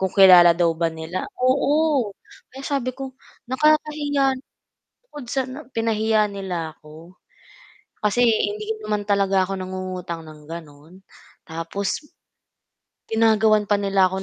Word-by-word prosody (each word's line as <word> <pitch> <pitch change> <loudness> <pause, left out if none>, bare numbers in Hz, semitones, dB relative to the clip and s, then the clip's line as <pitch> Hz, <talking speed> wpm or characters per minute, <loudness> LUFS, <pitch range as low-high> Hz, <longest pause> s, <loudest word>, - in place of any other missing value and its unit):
kung 190 - +1
kilala 180 -3 +7
daw 170 -1 +3
ba 165 +1 0
nila 160 +3 -5
oo 280 0 +2 0.4
kaya 270 +1 -10
sabi 255 -3 -2
ko 270 -1 -6 0.3
nakakahiya 290 0 +2 0.8
bukod 295 -4 -9
sa 265 -1 -1 0.2
pinahiya 220 -1 +1
nila 180 -5 -5
ako, 160 +4 -15 0.9
kasi 210 +4 +2
hindi 215 -2 +1 0.2
naman 210 -1 -1
talaga 195 -2 +1
ako 195 - -2
nangungutang 185 -2 -5
ng 155 -2 -13
gano'n, 155 -1 -10 0.5
tapos 165 - -4 1.1
ginagawan 220 -1 +3
pa 205 - +2
nila 195 -1 +3
ako 190 +1 -3
200 Hz, 120 wpm, -22 LUFS, 175-245 Hz, 1.1 s, kilala